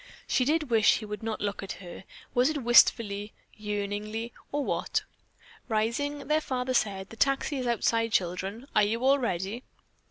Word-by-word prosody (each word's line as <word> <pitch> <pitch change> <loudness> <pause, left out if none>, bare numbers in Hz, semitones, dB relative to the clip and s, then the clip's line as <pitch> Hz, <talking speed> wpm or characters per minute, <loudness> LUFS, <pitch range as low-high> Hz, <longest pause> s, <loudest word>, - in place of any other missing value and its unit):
She 255 - +1
did 305 -2 0
wish 220 -3 +5
he 220 - -6
would 210 -1 -6
not 225 -1 -3
look 205 -1 -2
at 195 - -5
her 185 0 -10 0.3
was 250 +3 +4
it 295 -4 -3
wistfully, 215 -3 +4 0.2
yearningly 210 +2 -4 0.2
or 290 -1 -1
what? - - -1 0.7
Rising, 265 +6 -1
their 305 +1 +2
father 255 -3 -2
said, 195 -5 0
"The - - -9
taxi 275 +3 +1
is 255 -2 -2
outside, 230 -1 +1
children. 190 +6 -1
Are 215 - +6
you 225 +4 +1
all 275 +1 +5
ready?" 200 0 -2
225 Hz, 165 wpm, -28 LUFS, 205-255 Hz, 0.7 s, Are